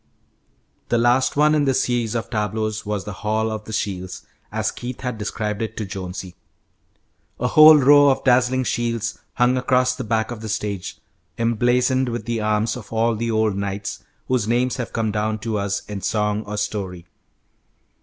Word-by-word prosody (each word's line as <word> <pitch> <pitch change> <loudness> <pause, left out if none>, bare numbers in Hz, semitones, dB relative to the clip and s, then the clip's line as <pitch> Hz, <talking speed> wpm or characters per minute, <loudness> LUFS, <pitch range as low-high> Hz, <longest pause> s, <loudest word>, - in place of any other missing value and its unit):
The 120 - +2
last 120 +4 +2
one 150 +1 +5
in 150 -2 +2
this 135 -1 +2
series 120 -2 -1
of 115 - -3
tableaux 110 0 -1
was 105 -2 -2
the 105 - -5
Hall 110 +3 -1
of 110 0 -5
the - - -8
Shields, 95 -3 -4 0.3
as 110 0 -1
Keith 125 0 -7
had 125 -4 -4
described 105 0 -3
it 110 0 -4
to 110 - -2
Jonesy. 95 -1 -6 1.1
A 125 - 0
whole 155 +2 +9
row 145 +1 +6
of 135 - +1
dazzling 130 0 +3
shields 115 -2 -2
hung 125 +1 +2
across 125 0 +2
the 130 - -5
back 110 0 -1
of 115 -2 -6
the 110 - -6
stage, 105 -3 -3 0.4
emblazoned 125 +3 +2
with 120 0 -4
the 115 -2 -2
arms 105 +1 0
of 125 -4 -10
all 115 +1 +1
the 115 +2 -2
old 110 -2 +1
knights 100 0 -4 0.2
whose 125 -5 0
names 120 +2 +1
have 125 -2 -4
come 110 -2 -1
down 110 +1 -1
to 110 -1 -3
us 100 0 -2
in 105 -2 -6
song 105 0 -1
or 105 0 -5
story. 95 -4 -4
110 Hz, 180 wpm, -22 LUFS, 105-125 Hz, 1.1 s, whole